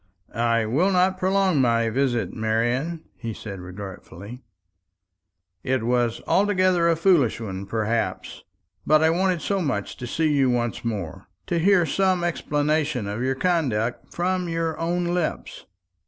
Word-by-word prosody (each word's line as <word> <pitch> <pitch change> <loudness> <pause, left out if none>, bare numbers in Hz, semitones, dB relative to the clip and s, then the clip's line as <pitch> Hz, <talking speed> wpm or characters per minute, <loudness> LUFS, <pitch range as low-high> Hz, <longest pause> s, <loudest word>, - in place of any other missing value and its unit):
"I 115 0 +1
will 145 - +2
not 185 0 +2
prolong 190 -5 +2
my 115 -2 +2
visit, 125 -2 0
Marian," 120 +9 -1
he 115 -3 -5
said 100 -3 -8
regretfully. 95 +4 -9 1.2
"It 130 0 -1
was 120 -1 0
altogether 185 -3 +3
a 165 - +3
foolish 165 - +3
one, 100 -3 -6
perhaps; 115 +2 -2 0.4
but 155 0 +4
I 160 - +4
wanted 180 -2 0
so 200 -1 0
much 130 - -2
to 120 - -6
see 155 +4 0
you 135 -3 +3
once 120 -1 -1
more, 100 -5 -5 0.2
to 170 - -1
hear 180 0 +4
some 185 +3 +1
explanation 150 -5 0
of 105 +3 -4
your 130 +1 0
conduct 130 -9 -1
from 180 0 -1
your 165 -1 -1
own 175 +2 -1
lips." 175 -1 -3
140 Hz, 140 wpm, -24 LUFS, 115-175 Hz, 1.2 s, but